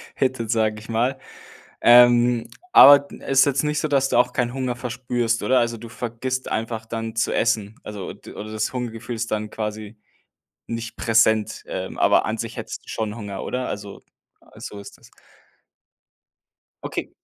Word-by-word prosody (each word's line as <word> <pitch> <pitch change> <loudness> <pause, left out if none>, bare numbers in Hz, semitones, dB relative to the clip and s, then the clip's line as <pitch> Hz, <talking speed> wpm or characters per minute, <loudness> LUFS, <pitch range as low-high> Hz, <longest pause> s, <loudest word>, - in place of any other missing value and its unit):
hittet, 130 -4 -1
sage 110 -2 +1
ich 110 - -14
mal. 120 +4 0 0.6
Ähm, 120 0 +6 0.2
aber 145 0 +10
d 140 - -13
ist 135 0 +4
jetzt 140 -1 +1
nicht 150 0 0
so, - - -1
dass 135 -2 +2
du - - +2
auch 125 0 +3
keinen 120 -2 -1
Hunger 130 -2 -2
verspürst, 120 -1 -2
oder? 130 0 +3
Also 115 -1 -1
du 115 +1 -10
vergisst 120 +3 -4
einfach 110 0 -3
dann 115 0 -5
zu 115 - 0
essen, 110 -2 0
also 105 -3 -7
d - - -13
oder 110 +1 -8
das 110 +2 -2
Hungergefühl 120 -1 -5
ist 115 0 -4
dann 110 0 -2
quasi 105 0 -6 0.7
nicht 115 0 -5
präsent, 110 -1 +2
ähm, - - -5
aber - - +4
an - - -2
sich - - -5
hättest - - -7
du - - -15
schon 105 -2 -3
Hunger, 105 -4 -6
oder? 125 0 -3
Also 100 -1 -7 0.6
so 105 - -8
ist 100 - -12
das. - - -20 1.7
Okay. - - -4
115 Hz, 170 wpm, -23 LUFS, 110-125 Hz, 1.7 s, aber